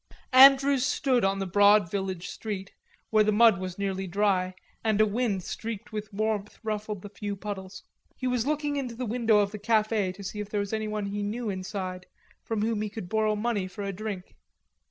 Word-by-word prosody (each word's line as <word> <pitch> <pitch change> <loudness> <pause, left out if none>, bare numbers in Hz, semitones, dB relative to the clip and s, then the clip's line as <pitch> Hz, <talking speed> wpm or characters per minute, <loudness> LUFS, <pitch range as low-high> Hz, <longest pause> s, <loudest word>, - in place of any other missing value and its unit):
Andrews 270 0 +7
stood 265 -3 +1
on 195 0 +2
the 195 - -2
broad 205 -1 +5
village 190 -3 -3
street, 200 -3 -6 0.4
where 215 -1 +5
the 215 - +2
mud 215 -2 +5
was 185 -1 -5
nearly 195 -1 -2
dry, 185 -1 +1 0.3
and 215 -2 +1
a 215 - +6
wind 210 -3 -1
streaked 225 +3 -6
with 210 -1 -5
warmth 210 0 -2
ruffled 210 -2 -3
the 205 - -7
few 205 0 -5
puddles; 190 -2 -7 0.3
he 255 - -5
was 250 -1 0
looking 295 -1 0
into 250 -4 -3
the 250 +2 -3
window 230 -1 +2
of 200 -1 +2
the 210 - -7
cafe 215 -2 +1
to 200 +2 -11
see 195 +2 -5
if 210 -1 -5
there 210 - -1
was 200 +1 -3
anyone 215 -1 -2
he 205 +1 -3
knew 215 +2 -2
inside 185 -1 -5 0.3
from 220 -2 -2
whom 220 -1 0
he 215 - -2
could 200 -4 -7
borrow 215 0 +1
money 210 -3 -1
for 190 +2 -7
a 200 0 -3
drink. 200 -2 -6
210 Hz, 200 wpm, -27 LUFS, 195-225 Hz, 0.4 s, Andrews